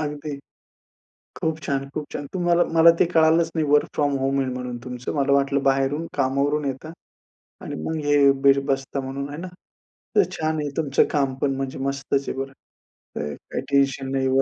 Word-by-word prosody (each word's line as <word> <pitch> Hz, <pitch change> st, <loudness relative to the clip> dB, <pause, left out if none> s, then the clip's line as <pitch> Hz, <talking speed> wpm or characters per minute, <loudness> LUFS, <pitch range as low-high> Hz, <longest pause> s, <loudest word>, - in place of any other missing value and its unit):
अगदी, 150 Hz, -1 st, -4 dB, 1.0 s
खूप 160 Hz, -1 st, -1 dB
छान, 140 Hz, -1 st, -2 dB
खूप 150 Hz, -, -3 dB
छान. 145 Hz, -, -5 dB
तुम्हाला 175 Hz, -1 st, +2 dB
मला 165 Hz, +1 st, +8 dB
ते -, -, +5 dB
कळालंच 160 Hz, +1 st, +4 dB
नाही 160 Hz, -2 st, 0 dB
वर्क 145 Hz, 0 st, +4 dB
फ्रॉम 145 Hz, -1 st, +1 dB
होम 135 Hz, +1 st, 0 dB
आहे 130 Hz, -, -1 dB
म्हणून 125 Hz, -1 st, -5 dB
तुमचं. 125 Hz, -1 st, -5 dB
मला 140 Hz, -1 st, +1 dB
वाटलं 140 Hz, 0 st, +2 dB
बाहेरून 135 Hz, +4 st, +1 dB
कामावरून 140 Hz, +2 st, +1 dB
येता 140 Hz, +4 st, -4 dB, 0.7 s
आणि -, -, -5 dB
मग 160 Hz, -, -2 dB
हे 145 Hz, -1 st, +5 dB
बीर 140 Hz, 0 st, +5 dB
बसता 135 Hz, 0 st, -1 dB
म्हणून 135 Hz, +1 st, -5 dB
आहे 145 Hz, -, -7 dB
ना? 185 Hz, -, -5 dB, 0.7 s
तर 410 Hz, -, +6 dB
छान 155 Hz, 0 st, -1 dB
आहे 150 Hz, -, -2 dB
तुमचं 145 Hz, -4 st, +3 dB
काम, 140 Hz, -3 st, +1 dB
पण 135 Hz, -1 st, +1 dB
म्हणजे 135 Hz, 0 st, -4 dB
मस्तच 135 Hz, 0 st, -1 dB
आहे -, -, -4 dB
बरं, 135 Hz, 0 st, -4 dB, 0.6 s
तर 75 Hz, 0 st, -3 dB, 0.2 s
काही -, -, -2 dB
टेन्शन 135 Hz, -1 st, +2 dB
नाही, 135 Hz, -1 st, +1 dB
140 Hz, 180 wpm, -23 LUFS, 135-150 Hz, 1.0 s, मला